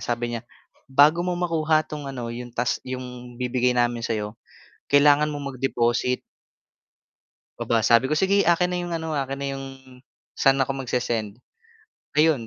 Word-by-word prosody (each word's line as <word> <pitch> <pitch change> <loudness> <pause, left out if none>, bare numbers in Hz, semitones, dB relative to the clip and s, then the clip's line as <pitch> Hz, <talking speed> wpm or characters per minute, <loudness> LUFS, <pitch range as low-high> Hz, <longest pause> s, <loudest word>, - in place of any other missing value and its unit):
sabi 120 0 -2
niya, 115 -1 -4 0.5
"Bago 145 +5 +5
mo 180 0 -1
makuha 160 -3 +1
'tong 145 -2 -7
ano 120 -3 -5
yung 120 +1 -7
task 125 +1 0
yung 125 -1 -7
bibigay 125 0 0
namin 120 -1 +1
sa 115 -1 -1
'yo, 105 0 -4 0.6
kailangan 145 +1 +5
mong 145 -2 -4
mag-deposit." 125 -1 0 1.4
Aba 115 -1 +1
sabi 115 +3 +4
ko 135 - -1
"Sige 195 +5 +3
akin 175 +1 +3
na 180 - -2
'yong 175 -1 -4
ano, 160 -1 -3
akin 135 0 -2
na 140 - -2
'yong 135 - -7 0.7
saan 135 0 +3
ako 135 +1 0
magse-send?" 120 -4 -2 0.7
Ayun 150 -6 +3
135 Hz, 155 wpm, -24 LUFS, 120-150 Hz, 1.4 s, Bago